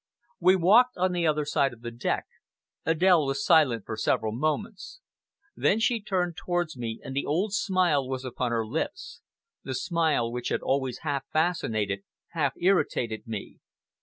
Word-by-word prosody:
..." 235 - -42
We 185 +2 +5
walked 220 +8 +5
on 185 +1 +1
the 175 -2 0
other 150 -1 +1
side 140 -2 +1
of 115 - -15
the 120 0 -6
deck. 120 +1 -2 0.6
Adèle 165 -1 +4
was 135 +10 -1
silent 130 - +4
for 110 - -4
several 110 0 0
moments. 180 - -3 0.6
Then 215 - +2
she 230 0 +1
turned 180 -4 -1
towards 175 -3 -2
me, 115 -2 -5
and 135 - -7
the 140 - -1
old 185 +8 0
smile 180 -10 +2
was 130 0 -4
upon 125 -1 -2
her 115 -1 0
lips 265 - -4 0.4
the - - -4
smile 160 - 0
which 125 0 -3
had - - -1
always 130 -2 -1
half 140 -3 -1
fascinated, 110 - 0 0.3
half 150 -5 0
irritated 150 - 0
me. 110 -3 -6
155 Hz, 165 wpm, -27 LUFS, 125-185 Hz, 0.6 s, We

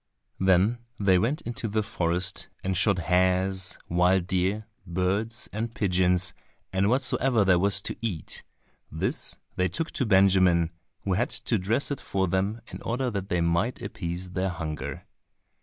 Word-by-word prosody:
Then 95 +5 +3 0.2
they 95 -3 +4
went 130 +10 0
into 120 0 -4
the 110 +1 0
forest 90 -2 -1
and 95 0 0
shot 95 +2 +3
hares, 95 +1 +1
wild 90 +1 +3
deer, 95 +4 0 0.2
birds 95 +5 -1
and 115 +2 -3
pigeons, 90 -2 +2 0.4
and 95 +2 +2
whatsoever 125 -3 +2
there 90 -2 +5
was 100 +1 +3
to - - -3
eat; 100 -9 -3 0.5
this - - -2 0.2
they 90 - +3
took 155 - -3
to 130 - -1
Benjamin, 95 -4 +4 0.3
who 95 - 0
had 90 - +1
to - - -1
dress 110 +11 0
it 140 - -3
for 95 -1 0
them 95 +6 0
in - - -8
order 125 +2 -1
that 100 -2 -4
they 90 -1 +1
might 85 +9 +1
appease 90 +1 -5
their 95 +1 0
hunger. 75 -5 -5
95 Hz, 155 wpm, -27 LUFS, 90-110 Hz, 0.5 s, there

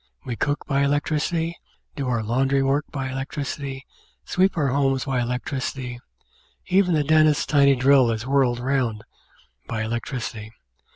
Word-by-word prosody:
We 125 -3 -3
cook 145 +6 -1
by 140 -1 +1
electricity, 155 +4 0 0.4
do 140 -3 -3
our 120 -3 0
laundry 135 +5 +1
work 140 +2 +1
by 135 -2 -3
electricity, 135 0 -5 0.4
sweep 190 +1 +1
our 145 -3 +2
rooms 135 -2 +1
by 130 -3 0
electricity, 125 0 -3 0.7
even 185 -2 +3
the 150 - +2
dentist's 155 0 +4
tiny 140 -2 +4
drill 130 -1 +5
is 115 0 -2
whirled 130 -3 +2
round 125 -4 -1 0.6
by 110 -1 -2
electricity. 115 -1 -4
135 Hz, 135 wpm, -23 LUFS, 125-145 Hz, 0.7 s, drill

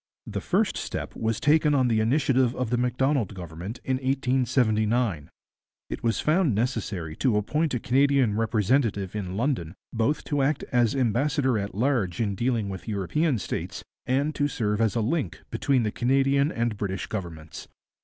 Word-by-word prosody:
The - - -4
first - - +1
step - - -5
was 110 -1 -1
taken 150 0 +3
on 130 -2 +3
the 115 -2 +2
initiative 130 +1 +2
of 125 -2 -2
the 120 - +2
Macdonald 125 -3 0
Government 90 +5 -7
in 130 -1 0
1879. 125 - +1 0.6
It - - -4
was 115 -1 +1
found 155 - +2
necessary 100 -8 -2
to 120 -6 +2
appoint 150 +7 0
a - - -1
Canadian 135 -3 +3
representative 110 -2 +1
in 95 -2 -4
London 115 - -1 0.2
both 120 +6 0
to 145 -1 -1
act 140 +2 +1
as 120 0 +2
ambassador 130 0 +1
at 100 0 -5
large 110 -7 0
in 105 -3 0
dealing 115 0 0
with 95 +1 -7
European 120 - 0
states, 100 - -4 0.2
and 140 +4 +1
to 145 -1 +1
serve 105 -5 -1
as 110 -1 +2
a 115 - +1
link 135 +8 -2
between 135 -2 +1
the 105 - -1
Canadian 135 +4 +2
and 115 -2 -1
British 95 -2 -3
Governments. 85 -6 -7
120 Hz, 165 wpm, -26 LUFS, 105-135 Hz, 0.6 s, taken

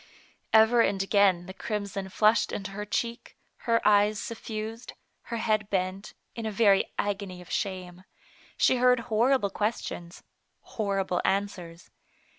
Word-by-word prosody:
Ever 220 +2 +6
and 195 -3 +1
again 195 -3 +3
the 190 - -8
crimson 200 -1 -4
flushed 215 +2 +3
into 195 -1 -5
her 210 +1 -5
cheek, 235 +3 -4 0.3
her 230 0 +3
eyes 210 0 +4
suffused, 225 0 -6 0.3
her 235 - -4
head 215 -2 0
bent, 190 +1 -3 0.2
in 230 -1 -5
a - - -2
very 200 -2 +3
agony 200 -3 -3
of 180 - -13
shame; 185 -2 -4 0.5
she 255 - +3
heard 250 -1 +4
horrible 230 -1 +2
questions, 195 -5 -4 0.4
horrible 195 -4 -2
answers. 180 -4 -3
205 Hz, 130 wpm, -27 LUFS, 190-220 Hz, 0.5 s, Ever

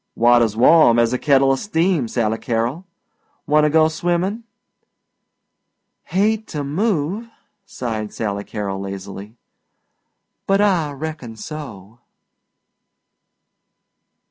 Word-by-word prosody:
"Water's 120 -2 +3
warm 125 -1 +6
as 115 0 +2
a 125 - -1
kettla 135 -2 +3
steam, 170 - 0
Sally 110 -1 -1
Carol. 120 +10 -2 0.6
Wanta 150 0 +3
go 155 +1 +4
swimmin'?" 175 +7 -2 1.6
"Hate 215 +3 0
to 150 -3 -4
move," 190 +6 -1 0.4
sighed 110 -4 -4
Sally 100 -2 -3
Carol 100 -3 -4
lazily, 100 +2 -8 1.1
"but 195 0 +3
I 180 -8 +2
reckon 145 -5 -7
so." 115 - -9
140 Hz, 90 wpm, -20 LUFS, 115-170 Hz, 1.6 s, warm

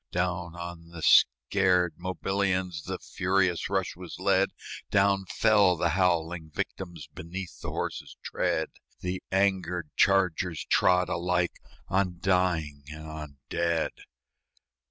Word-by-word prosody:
Down 90 -1 -1
on 85 -1 -8
the 85 -2 -9
scared 90 +8 +4
Mobilians 95 -2 -1
The - - -3
furious 95 -2 0
rush 95 -2 -1
was 90 -1 -9
led; 95 +1 +3 0.4
Down 100 -1 +3
fell 105 -5 +4
the 85 +1 +1
howling 85 -2 +1
victims 85 0 -5
Beneath 90 +2 -7
the - - -4
horses' - - -4
tread; - - -1 0.3
The 90 +1 -3
angered 90 -4 +1
chargers 90 -4 +2
trod 90 -1 +3
alike 90 0 0 0.3
On 95 -2 0
dying 85 -6 +1
and 80 0 -8
on 75 -2 -8
dead. 85 0 0
90 Hz, 115 wpm, -28 LUFS, 85-95 Hz, 0.4 s, scared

